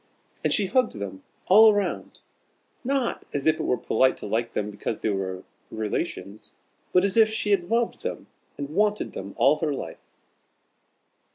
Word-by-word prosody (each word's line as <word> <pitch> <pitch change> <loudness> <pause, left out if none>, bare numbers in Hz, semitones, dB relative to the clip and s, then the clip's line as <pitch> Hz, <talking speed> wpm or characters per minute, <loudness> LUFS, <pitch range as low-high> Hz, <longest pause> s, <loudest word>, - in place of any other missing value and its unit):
And - - +1
she 205 - +2
hugged 250 +4 +1
them 100 -2 -6 0.2
all 215 +2 +7
round, 205 - -3 0.6
not 265 -1 -1
as 140 - -2
if 155 0 +3
it - - -1
was 125 - -1
polite 130 +3 +3
to - - -8
like 115 +3 -1
them 105 0 -2
because 105 +1 -4
they 110 - 0
were 95 -1 -3 0.3
relations, 105 -2 -4 0.4
but 180 +1 +4
as 200 +2 0
if 220 -1 +6
she 215 -1 -2
had 185 -4 +2
loved 230 +5 0
them - - -5 0.3
and 140 0 -5
wanted 210 +4 +1
them 100 +1 -7
all 145 +3 +4
her 155 -2 -1
life. - - -9
150 Hz, 170 wpm, -25 LUFS, -, 0.6 s, all